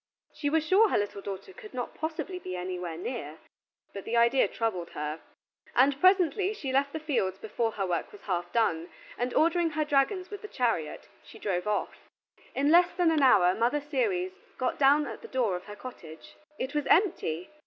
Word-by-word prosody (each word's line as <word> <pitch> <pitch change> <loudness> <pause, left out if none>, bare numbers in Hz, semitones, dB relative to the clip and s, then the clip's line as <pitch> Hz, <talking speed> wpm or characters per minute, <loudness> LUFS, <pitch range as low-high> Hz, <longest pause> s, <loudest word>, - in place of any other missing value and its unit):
She 290 - -2
was 315 +1 +1
sure 405 +6 +5
her - - +2
little 205 -1 -2
daughter 195 - -7
could 425 - -12
not 245 -1 -4
possibly 325 +4 -4
be 185 - -6
anywhere 180 -2 -4
near, 170 - -5 0.6
but 200 - -6
the 235 - -1
idea 235 +3 +4
troubled 185 -7 -2
her: 150 +2 -4 0.5
and 275 +2 +4
presently 370 +2 +4
she 270 -9 -4
left 280 +1 +2
the 315 - -4
fields 245 - -1
before 225 +2 -2
her 195 - -2
work 175 -2 -2
was 415 - -13
half 175 -2 -3
done 170 -8 +1 0.3
and, 245 +1 -2
ordering 335 +1 +3
her 305 0 -1
dragons 300 +7 +1
with 410 - -7
the 425 - -7
chariot, 230 - -2
she - - -14
drove 185 -1 -2
off. 210 - -3 0.5
In 285 +2 +2
less 350 +1 +6
than 350 -2 +3
an 310 -2 +2
hour 190 -9 +6
Mother 235 +8 +1
Ceres 370 - -1 0.3
got 255 - -1
down 290 +2 +5
at 230 -5 -7
the - - -9
door 240 -8 0
of 180 - -7
her 205 - -9
cottage. 175 -9 -11 0.2
It 260 +3 -4
was 295 -2 -1
empty! 245 - +2
255 Hz, 195 wpm, -29 LUFS, 195-320 Hz, 0.6 s, less